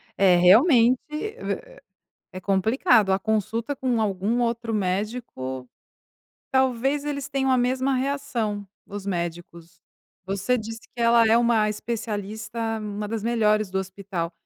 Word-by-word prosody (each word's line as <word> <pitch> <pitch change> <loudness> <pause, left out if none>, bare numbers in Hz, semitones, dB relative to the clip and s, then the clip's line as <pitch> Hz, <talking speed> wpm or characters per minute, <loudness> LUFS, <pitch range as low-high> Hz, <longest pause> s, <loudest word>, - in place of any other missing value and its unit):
É 190 -2 +5
realmente, 235 - +6
é 450 +8 -5 0.6
é 185 - -6
complicado, 205 - +3
a 190 - +2
consulta 220 +5 -1
com 250 -3 0
algum 210 +3 0
outro 230 -1 -1
médico, 185 - -3 0.8
talvez 265 +2 +1
eles 280 -2 -3
tenham 270 -1 -1
a 255 - +4
mesma 260 +2 +1
reação, 235 -7 -2 0.2
os 200 -1 -7
médicos. 170 -2 -5 0.5
Você 200 +6 0
disse 225 +1 -7
que 240 - -4
ela 230 0 +5
é 225 - +5
uma 235 -3 +3
especialista, 220 +1 -4
uma 210 0 -5
das 220 0 -4
melhores 215 -3 +1
do 190 - 0
hospital. 190 -3 -5
220 Hz, 130 wpm, -24 LUFS, 195-245 Hz, 0.8 s, realmente